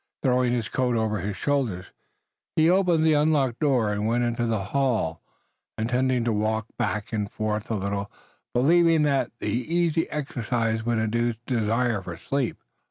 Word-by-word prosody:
Throwing 125 -2 +2
his 120 -3 -1
coat 125 0 0
over 110 -2 0
his 100 +1 -4
shoulders, 125 -11 -1 0.7
he 160 0 +4
opened 180 -4 +3
the 160 -1 +4
unlocked 145 -5 +2
door 125 -8 +2
and 105 +1 -1
went 120 +2 +1
into 120 0 0
the 110 -3 0
hall, 115 -12 0 0.6
intending 125 +2 +1
to 115 -1 0
walk 110 +1 0
back 110 -2 -2
and 105 -2 -1
forth 110 0 -3
a 115 - 0
little, 100 0 -3 0.4
believing 165 +4 +4
that 140 -2 +1
the - - -5
easy 165 +7 0
exercise 115 -6 -2
would 120 0 0
induce 115 +2 0
desire 115 -2 0
for 85 -3 -7
sleep. 135 +6 -2
120 Hz, 160 wpm, -25 LUFS, 110-140 Hz, 0.7 s, he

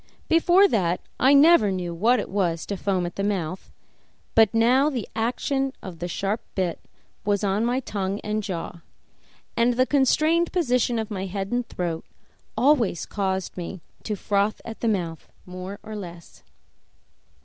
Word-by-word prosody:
Before 350 +4 +5
that, 180 - +1 0.2
I 270 +3 +6
never 285 -7 +6
knew 180 -2 -3
what 225 +8 +3
it - - -3
was 175 -4 -1
to 200 - -3
foam 190 -2 -1
at 175 - -6
the 195 - -1
mouth, 190 -3 -3 0.6
but 220 -2 +5
now 250 +6 +4
the 250 -8 -4
action 265 +4 -1
of 180 -4 -8
the 175 - -3
sharp 200 +4 -2
bit 180 -4 -1 0.4
on 205 0 +1
my 250 +2 0
tongue 200 -3 -3
and 210 0 -2
jaw, 175 -3 -5 0.7
and 235 +1 +3
the 255 +1 +3
constrained 310 +5 +2
position 250 -8 +1
of 220 -1 -3
my 195 -1 -3
head 195 +2 -4
and 245 0 -1
throat, 170 -2 -3 0.5
always 250 - +3
caused 190 -2 -2
me 180 0 -6 0.2
to 215 - -3
froth 200 +1 0
at 225 -1 -7
the 230 - -1
mouth 170 -7 -2
more 185 +2 -7
or 215 - -7
less. 175 -4 -9
205 Hz, 160 wpm, -24 LUFS, 185-245 Hz, 0.7 s, I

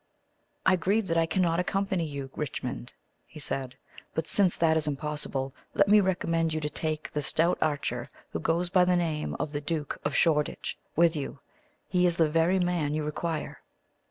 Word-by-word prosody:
"I 185 0 +5
grieve 200 +5 +1
that 165 - +2
I 165 - +2
cannot 170 -2 +1
accompany 190 -1 0
you, 140 -2 -6
Richmond," 120 - -4 0.3
he - - -11
said; 130 -3 -3 0.4
"but 160 0 -1
since 195 -4 +3
that 160 -1 +3
is 155 -1 +1
impossible, 145 -2 -3 0.2
let 200 - +4
me 210 +1 +7
recommend 165 -4 0
you - - 0
to 150 -1 -2
take 155 -1 -2
the 150 - -1
stout 165 +4 +2
archer 145 -5 -1 0.2
who - - -2
goes 170 +2 0
by 185 -2 +5
the 180 0 +3
name 160 -3 -1
of 150 - -2
the 145 -1 -3
Duke 150 -1 -3
of 145 - -1
Shoreditch 150 -3 +1 0.2
with 170 0 +4
you. 145 -1 -4 0.5
He 180 -1 +3
is 175 - +1
the 160 -3 +3
very 165 +4 +3
man 175 -5 0
you 155 - -1
require." 155 +1 -3
160 Hz, 185 wpm, -28 LUFS, 150-175 Hz, 0.5 s, me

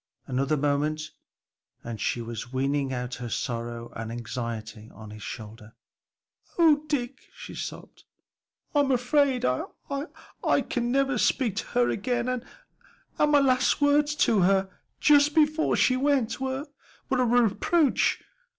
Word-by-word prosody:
Another 135 +4 0
moment 150 +2 -1 0.7
and 115 -3 -6
she 120 - -1
was 115 +1 -7
weening 135 +1 0
out 125 -1 -4
her 120 - -4
sorrow 120 -1 -4
and 115 0 -5
anxiety 115 -1 -6
on 110 0 -11
his 105 0 -10
shoulder. 110 +1 -9 0.8
"O 325 -4 +6
Dick," 265 -3 -3
she - - -9
sobbed, - - -8 0.7
"I'm 285 -2 +3
afraid 255 +1 +2
I 275 - -3
can 240 -1 0
never 270 -2 +1
speak 230 -5 +1
to - - -3
her 245 - +4
again, 240 +3 -1
and 255 -1 -2 0.8
and 300 - +3
my 290 -1 +6
last 255 -2 +2
words 290 +1 +3
to 220 -3 +2
her, 190 +1 +2 0.3
just 295 0 +5
before 310 0 +3
she 255 - +3
went, 260 -4 +1
were 265 +2 -2 0.5
a 265 - +3
reproach. 245 - +2
230 Hz, 130 wpm, -26 LUFS, -, 0.8 s, O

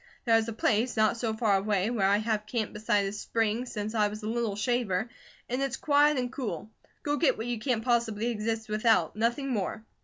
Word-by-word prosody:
There's 225 -1 +3
a 230 - -3
place, 225 +2 +1
not 215 +1 +3
so 230 -1 -1
far 220 -3 +2
away, 200 +1 0
where 205 -5 +2
I 200 +1 +4
have 215 -1 -1
camped 220 -1 -2
beside 210 -1 +1
a 195 - -2
spring 225 +3 -1
since 210 -1 -4
I 215 -2 +3
was 210 +1 -7
a - - -3
little 225 -2 -1
shaver, 220 -2 0 0.4
and 250 +2 -2
it's 270 -1 -1
quiet 295 0 +3
and 250 0 -2
cool. 215 - -4 0.3
Go 290 0 0
get - - +2
what 225 - -4
you 240 -2 -2
can't 230 -1 -1
possibly 230 -3 +1
exist 225 0 -2
without, 215 +1 +2
nothing 240 +5 0
more." 215 0 -2
225 Hz, 210 wpm, -28 LUFS, 210-240 Hz, 0.4 s, I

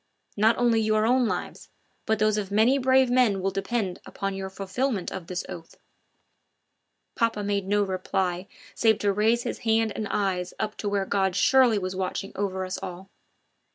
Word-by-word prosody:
Not 220 +2 +3
only 235 -2 +3
your 215 0 +2
own 250 +1 +3
lives, - - -5 0.4
but 220 - +2
those 215 0 +2
of 200 -2 -4
many 225 +7 +3
brave 260 -1 +3
men 245 -6 +3
will 195 +1 -1
depend 195 -1 -2
upon 195 0 -4
your 195 0 -5
fulfilment 195 +2 -2
of 185 -3 -7
this 180 0 -4
oath." 165 -1 -10 1.4
Papa 225 -3 0
made 200 -1 -1
no 205 +1 +2
reply 185 -1 -2 0.3
save 220 -2 +3
to 205 -2 +1
raise 225 +4 +2
his - - -4
hand 225 -1 +1
and 215 - -3
eyes 185 -3 -1
up 215 0 -2
to 205 - -2
where 200 -1 0
God 190 -2 0
surely 250 +1 +4
was 185 -1 -3
watching 190 +1 -3
over 190 -2 -2
us 185 +1 -4
all. 185 +2 -8
205 Hz, 175 wpm, -26 LUFS, 190-225 Hz, 1.4 s, surely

